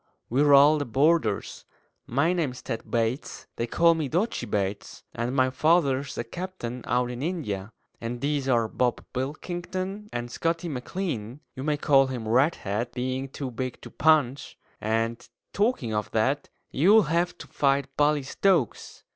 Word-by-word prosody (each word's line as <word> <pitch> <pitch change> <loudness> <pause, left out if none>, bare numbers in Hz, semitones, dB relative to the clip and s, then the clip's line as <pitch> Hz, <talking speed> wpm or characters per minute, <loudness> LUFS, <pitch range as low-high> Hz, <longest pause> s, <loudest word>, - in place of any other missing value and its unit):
"We're 140 +3 +5
all 145 +2 +6
the 145 - -2
boarders. 135 -3 +1 0.4
My 140 +8 +2
name's 145 -8 -2
Ted 115 - -5
Bates 115 +3 -2
they 115 - -2
call 170 +7 +4
me 160 -3 -2
Doggy 180 - -1
Bates 100 0 -3
and 120 +3 -2
my 130 -1 +3
father's 140 -2 +2
a - - -1
captain 175 -10 -6
out 125 0 +1
in 125 +1 -6
India; 120 - -3 0.3
and 120 +1 -4
these 140 0 -1
are 115 -3 +3
Bob 125 +2 -1
Pilkington 180 +9 -4
and 120 0 -4
Scotty 165 +5 -1
Maclean. 130 - -4
You 130 - -6
may 150 +1 0
call 135 -2 +4
him 125 -4 -5
Redhead, 120 - +1
being 130 +2 -2
too 135 -1 -5
big 130 +1 -4
to - - -10
punch; 145 -4 +2 0.2
and, 115 +2 -1 0.2
talking 205 - 0
of 105 0 -1
that, 130 +6 +1 0.2
you'll 205 +9 +5
have 170 +2 0
to - - -9
fight 140 -1 0
Bully 145 -1 +2
Stokes." 160 - 0
135 Hz, 155 wpm, -26 LUFS, 120-160 Hz, 0.4 s, all